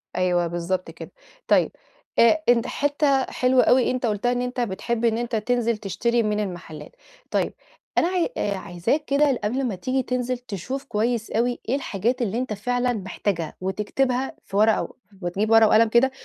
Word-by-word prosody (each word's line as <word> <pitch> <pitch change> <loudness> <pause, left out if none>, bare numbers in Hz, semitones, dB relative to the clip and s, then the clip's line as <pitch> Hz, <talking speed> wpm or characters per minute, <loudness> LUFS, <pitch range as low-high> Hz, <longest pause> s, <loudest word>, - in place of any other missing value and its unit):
أيوه 180 -1 +1
بالضبط 175 +2 -3
كده، - - -10 0.4
طيب - - +3 0.5
آآ، 315 +7 +5
أنت 235 -1 +4
حتة 285 -1 +1
حلوة 255 0 +3
أوي 255 0 +4
أنت 255 0 -2
قُلتها 220 +2 0
إن 245 0 0
أنت 250 0 -3
بتحب 235 +2 -2
إن 225 -1 +2
أنت 240 0 -2
تنزل 235 +1 0
تشتري 235 +4 0
من 210 -1 0
المحلات، 175 -6 -6 0.4
طيب، - - 0 0.4
أنا - - +4
عاي 360 +1 0
آآ، 200 -1 -1
عايزاك 190 - -2
كده 280 -2 +2
قبل 250 +6 0
ما 235 -6 -1
تيجي 255 +8 -1
تنزل 250 0 -2
تشوف 250 +3 -6
كويس 235 -2 -1
أوي 240 +2 0
إيه 255 - +2
الحاجات 245 -1 -1
اللي 225 -1 -1
أنت 255 -3 -2
فعلًا 245 +4 0
محتاجها. 190 -5 -3
وتكتبها 245 +7 -1
في 195 - -4
ورقة، 215 +1 +4
و - - -9 0.3
وتجيب 190 +5 -1
ورق 225 -1 +7
وقلم 220 +1 +5
كده 240 +4 +4
235 Hz, 175 wpm, -24 LUFS, 205-250 Hz, 0.5 s, ورق